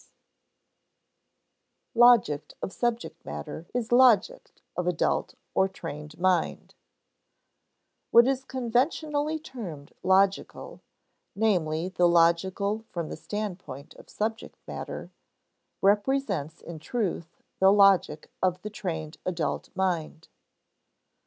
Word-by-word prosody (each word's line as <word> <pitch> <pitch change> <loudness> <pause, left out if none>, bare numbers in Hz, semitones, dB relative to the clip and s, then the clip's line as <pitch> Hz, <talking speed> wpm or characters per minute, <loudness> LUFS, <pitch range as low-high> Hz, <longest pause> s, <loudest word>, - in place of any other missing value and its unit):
[Sidenote: 240 +1 +8
Logic 155 -12 +2
of - - -4
subject 240 -1 -2
matter 75 - -7
is 240 -1 -3
logic 240 -4 +3 0.2
of 180 0 -2
adult 180 -2 0 0.2
or 190 - +3
trained 150 -4 -8
mind] 185 -1 0 1.4
What 235 +1 +7
is 265 -1 0
conventionally 290 +5 0
termed 215 - -9
logical 190 +1 +1 0.5
(namely, 180 -6 +1
the 180 -1 +3
logical 180 +5 +2
from 170 -3 -4
the - - -5
standpoint 180 -6 -6
of - - -16
subject 220 +1 -4
matter) - - -6 0.7
represents 205 - +1
in 170 -2 -8
truth 175 -4 -3 0.2
the 190 0 +6
logic 195 -6 +4
of 185 -1 +1
the 210 - -5
trained 160 -6 -5
adult 175 -3 -2
mind. 170 -4 -2
190 Hz, 100 wpm, -27 LUFS, 170-230 Hz, 1.4 s, Sidenote